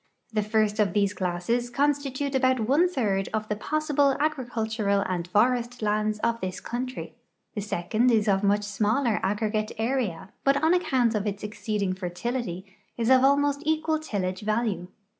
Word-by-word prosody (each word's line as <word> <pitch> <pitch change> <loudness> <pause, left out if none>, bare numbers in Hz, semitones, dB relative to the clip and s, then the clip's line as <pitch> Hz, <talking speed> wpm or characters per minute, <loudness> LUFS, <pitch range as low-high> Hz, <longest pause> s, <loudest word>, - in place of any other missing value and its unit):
The 215 - +2
first 215 0 +1
of 200 -4 +2
these 200 -1 +2
classes 190 +7 -1
constitute 280 +1 0
about 260 -1 +3
one 315 +8 +4
third 205 - 0
of 215 0 -2
the 210 - 0
possible 290 +2 +1
agricultural 225 -8 0
and 180 -2 -3
forestlands 215 -2 +1
of 230 0 0
this 185 0 -3
country; 250 +5 -5 0.4
the 210 - -3
second 215 +4 0
is 220 -3 +3
of 195 0 +2
much 205 +1 +2
smaller 215 +3 +1
aggregate 215 +1 -1
area, 225 -7 -1
but 275 0 +4
on 320 +2 +5
account 260 -10 +2
of 210 -1 -1
its 200 0 -4
e.xceeding 210 -2 -2
fertility 185 +1 -3 0.3
is 235 +1 +1
of 260 0 +6
almost 285 +1 +3
equal 315 0 +1
tillage 185 -10 -3
value. 215 -4 -1
220 Hz, 155 wpm, -26 LUFS, 205-260 Hz, 0.4 s, of